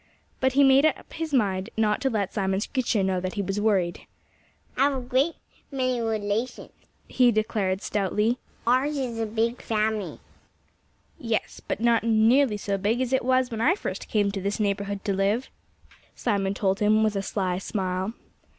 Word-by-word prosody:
But 260 -1 +2
he 280 +1 +5
made 270 +1 +6
up 310 - -4
his 325 -1 -4
mind 195 -8 +1
not 215 -1 +1
to 270 - +1
let 205 -5 -2
Simon 190 -1 0
Screecher 230 -3 0
know 190 -1 0
that 185 0 -4
he 205 - -1
was 195 +2 -2
worried. 190 -5 0 0.7
"I 275 - +3
have - - -2
a - - -2
great 260 +6 +1 0.4
many 255 -2 0
relations," 220 +1 -2 0.4
he 250 -2 +4
declared 210 -3 -1
stoutly. 210 +4 0 0.3
"Ours 260 +5 +2
is 245 -4 -3
a 225 - -1
big 230 +3 -1
family." 215 -2 -1 1.0
"Yes 230 -2 -2
but - - -2
not 235 -1 +3
nearly 230 +2 +4
so 200 -1 -2
big 215 +5 0
as 260 0 -1
it 260 - +2
was 255 0 +2
when 225 -1 -3
I 310 +10 +4
first - - -5
came 205 -2 +1
to 195 -1 -4
this 200 +3 -2
neighborhood 200 -1 -2
to 200 - +1
live," 200 +6 0 0.7
Simon 195 -1 -1
told 195 -1 0
him 215 +1 +3
with 215 -1 +1
a 195 - 0
sly 185 -2 -2
smile. 190 +1 -3
215 Hz, 180 wpm, -26 LUFS, 200-250 Hz, 1.0 s, made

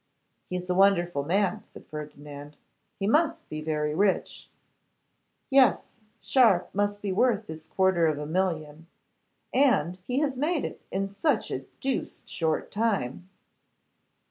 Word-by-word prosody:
'He 180 - -3
is 180 0 -4
a 180 - +1
wonderful 175 -6 +3
man,' 200 +6 0
said - - -13
Ferdinand. 150 -1 -9 0.4
'He 195 - -2
must 320 +8 +2
be 155 0 -5
very 150 -1 -1
rich.' 195 +3 0 1.0
'Yes; 265 -1 +4 0.3
Sharpe 220 -9 +3
must 205 +1 -1
be 200 - -1
worth 220 +2 +2
his 160 -2 -9
quarter 190 -3 +2
of 155 -2 0
a 150 - -4
million. 160 -2 -2 0.7
And 190 - +3
he 250 - -1
has 280 -3 0
made 300 +4 0
it - - -7
in 195 +1 -2
such 290 -9 +1
a 130 +1 -4 0.2
deuced 270 0 -3
short 160 -2 -1
time! 195 - -1
190 Hz, 140 wpm, -27 LUFS, 155-220 Hz, 1.0 s, Yes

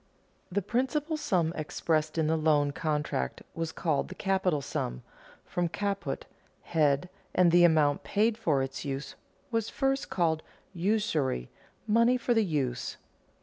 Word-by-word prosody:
The 200 +2 0
principal 270 - 0
sum 175 - +1
expressed 155 0 -1
in 160 - +2
the 160 +1 +2
loan 150 -2 +3
contract 150 - -2
was 165 -1 -3
called 155 -5 0
the - - -9
capital 190 -5 +1
sum, 60 - -4 0.4
from 175 -1 -1
caput, 200 +2 -2 0.4
head, 150 -1 +2 0.3
and 180 -2 +5
the 175 +1 +6
amount 155 -4 +4
paid 215 +2 +2
for 155 -11 +1
its 135 0 -5
use 140 0 -4 0.4
was 225 -2 0
first 270 0 0
called 160 -3 +1 0.3
usury, 170 - 0 0.3
money 230 +3 +4
for 245 0 +1
the 225 -1 +3
use. 135 - -2
165 Hz, 140 wpm, -29 LUFS, 150-205 Hz, 0.4 s, the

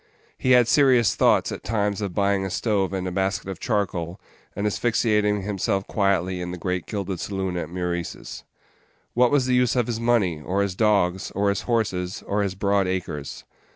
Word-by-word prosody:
He 130 - +2
had 125 -2 +6
serious 130 -5 +4
thoughts - - +3
at - - -6
times 105 -2 -1
of 100 -4 -4
buying 100 -1 +2
a 95 - -2
stove 100 -1 0
and 95 -1 -3
a - - -3
basket 95 +1 -1
of 95 - -6
charcoal, 95 -6 -2 0.4
and 100 - -2
asphyxiating 105 -2 +1
himself 100 -1 -1
quietly 95 -3 0
in 90 - -4
the 90 - -5
great 90 0 -3
gilded 100 -4 -3
saloon 95 -2 -3
at 85 -3 -3
Meurice's. 85 -1 -4 0.7
What 125 0 +4
was 140 -2 +2
the 130 - +1
use 125 0 +3
of 125 -2 +2
his 115 -1 -3
money, 110 -10 +1
or 95 +6 0
his 100 -2 -2
dogs, 95 -4 +2
or 100 +1 +2
his 100 - 0
horses, 95 -5 -1
or 105 +1 0
his 100 -2 -2
broad 100 0 +1
acres? 90 -6 -4
100 Hz, 190 wpm, -24 LUFS, 90-110 Hz, 0.7 s, had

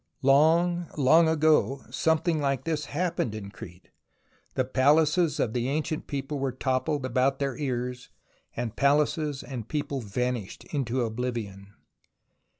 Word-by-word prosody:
Long, 165 +5 +4
long 155 +4 +5
ago 155 -3 +2
something 160 0 +1
like 135 -2 0
this 155 -1 -2
happened 155 -9 -2
in 100 -2 -7
Crete; 90 -3 -12 0.6
the 130 - +1
palaces 150 +5 +3
of 110 - 0
the 125 +1 -1
ancient 155 +2 -2
people 140 +1 -4
were 135 -1 -1
toppled 130 +2 -1
about 130 +2 +1
their 135 -2 -2
ears 125 -2 -3 0.5
and 115 -2 -4
palaces 145 0 +1
and 120 -5 -6
people 145 -2 -3
vanished 120 0 -3
into 130 -3 0
oblivion. 110 -4 -4
135 Hz, 130 wpm, -27 LUFS, 125-150 Hz, 0.6 s, long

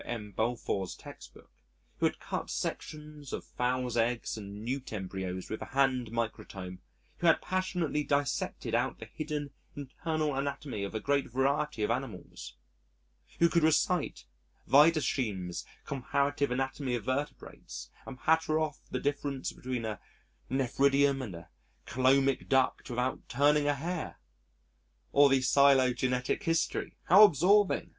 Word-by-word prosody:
M. 105 -4 -5
Balfour's 110 -3 -2
Textbook, - - -13 0.5
who - - +3
had - - -4
cut - - -4
sections 150 -2 -5
of - - -5
fowls' 125 -1 -1
eggs 115 0 0
and 105 0 -8
newt 130 +2 -3
embryos 95 -2 -4
with 110 - -5
a - - -9
hand 130 -3 +3
microtome, 105 -5 -5 0.4
who 175 - 0
had 165 - +6
passionately 180 -5 -1
dissected 145 - -1
out 120 +3 +1
the - - -9
hidden, 150 -2 -5 0.2
internal 150 +2 -2
anatomy 135 -5 -3
of 100 +2 -5
a - - 0
great 140 +3 0
variety 135 -1 0
of - - +1
animals, 60 - -5 0.8
who 170 - +5
could 170 0 +2
recite 160 +1 +1 0.4
Wiedersheim's 130 - +2 0.2
Comparative 140 +1 0
Anatomy 135 0 -1
of 120 - -4
Vertebrates 130 - -5 0.2
and 130 -1 -8
patter 160 -1 +2
off 155 -2 -2
the - - -2
difference 140 -1 -2
between 125 -2 -4
a 110 -2 -4 0.5
nephridium 135 +1 +2
and 105 -9 -6
a 85 - -11 0.4
cœlomic 135 +1 +2
duct 130 -1 +2
without 125 +1 -2
turning 145 +3 +3
a 145 - +2
hair 165 +3 -4 0.9
or 140 0 +6
the 135 -1 +3
phylogenetic 130 -2 +3
history 165 -3 -1
(how 195 +4 +8
absorbing!) 200 +3 +4
135 Hz, 135 wpm, -30 LUFS, 120-150 Hz, 0.9 s, how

